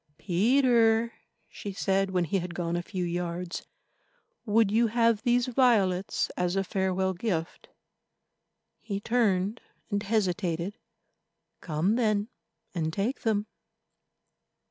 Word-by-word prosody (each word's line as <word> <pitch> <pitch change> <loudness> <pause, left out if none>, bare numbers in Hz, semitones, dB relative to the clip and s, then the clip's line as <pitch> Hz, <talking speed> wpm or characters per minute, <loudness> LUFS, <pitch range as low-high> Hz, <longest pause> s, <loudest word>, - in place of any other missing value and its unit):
"Peter," 230 +4 +3 0.3
she 205 - -7
said 195 0 0
when 180 -2 +1
he 180 +4 0
had 175 -1 -6
gone 170 -1 -2
a 175 - 0
few 180 +1 -4
yards, 175 0 -3 0.8
"would 215 -1 +3
you 230 +2 +4
have 230 -1 +2
these 245 +1 +2
violets 220 -8 +2
as 180 +1 0
a 195 - +1
farewell 190 0 0
gift?" 175 -4 -3 1.1
He 200 -3 -4
turned 210 -2 +1 0.3
and 205 0 0
hesitated. 190 -3 -1 0.8
"Come, 175 +7 0
then, 215 -2 +1 0.4
and 160 -3 -1
take 205 - -2
them." 215 -3 +1
195 Hz, 115 wpm, -28 LUFS, 180-225 Hz, 1.1 s, you